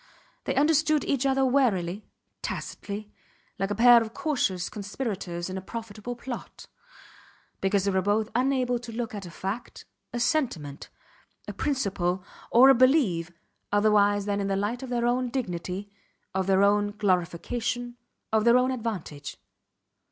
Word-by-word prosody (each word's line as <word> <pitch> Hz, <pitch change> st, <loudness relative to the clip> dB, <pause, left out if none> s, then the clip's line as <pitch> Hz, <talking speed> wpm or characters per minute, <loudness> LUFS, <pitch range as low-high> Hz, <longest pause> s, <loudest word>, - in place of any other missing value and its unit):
They -, -, -1 dB
understood 305 Hz, +1 st, +3 dB
each 275 Hz, -1 st, +1 dB
other 270 Hz, 0 st, +2 dB
warily, 215 Hz, -8 st, +1 dB, 0.3 s
tacitly, 205 Hz, +1 st, -5 dB, 0.5 s
like 195 Hz, -, 0 dB
a 205 Hz, -, -1 dB
pair 240 Hz, +2 st, +7 dB
of 225 Hz, 0 st, -6 dB
cautious 190 Hz, -, 0 dB
conspirators 200 Hz, -5 st, -4 dB
in 190 Hz, 0 st, -4 dB
a -, -, -9 dB
profitable 225 Hz, +3 st, -6 dB
plot; 240 Hz, 0 st, -8 dB, 0.9 s
because 195 Hz, 0 st, +1 dB
they 200 Hz, -, +2 dB
were 190 Hz, 0 st, +2 dB
both 210 Hz, +3 st, +1 dB
unable 250 Hz, -1 st, +1 dB
to 235 Hz, -1 st, -9 dB
look 230 Hz, 0 st, -4 dB
at 200 Hz, -3 st, -6 dB
a -, -, -8 dB
fact, 195 Hz, +7 st, -6 dB, 0.3 s
a 240 Hz, -, -3 dB
sentiment, 235 Hz, -, -1 dB, 0.6 s
a -, -, -5 dB
principle, 195 Hz, -, -1 dB, 0.3 s
or 255 Hz, +3 st, +7 dB
a -, -, +9 dB
belief 245 Hz, -, +3 dB, 0.4 s
otherwise 205 Hz, -1 st, +3 dB
than 205 Hz, -1 st, -1 dB
in 195 Hz, -, -1 dB
the 195 Hz, -, 0 dB
light 210 Hz, +6 st, -1 dB
of 265 Hz, -, -6 dB
their 240 Hz, -1 st, 0 dB
own 245 Hz, +1 st, +1 dB
dignity, 195 Hz, -4 st, -4 dB, 0.4 s
of 190 Hz, 0 st, -1 dB
their 195 Hz, 0 st, +4 dB
own 205 Hz, 0 st, +2 dB
glorification, 210 Hz, +6 st, -1 dB, 0.4 s
of 220 Hz, -1 st, +3 dB
their 235 Hz, +2 st, +6 dB
own 255 Hz, +1 st, +2 dB
advantage. 205 Hz, -, -5 dB
215 Hz, 150 wpm, -27 LUFS, 195-245 Hz, 0.9 s, a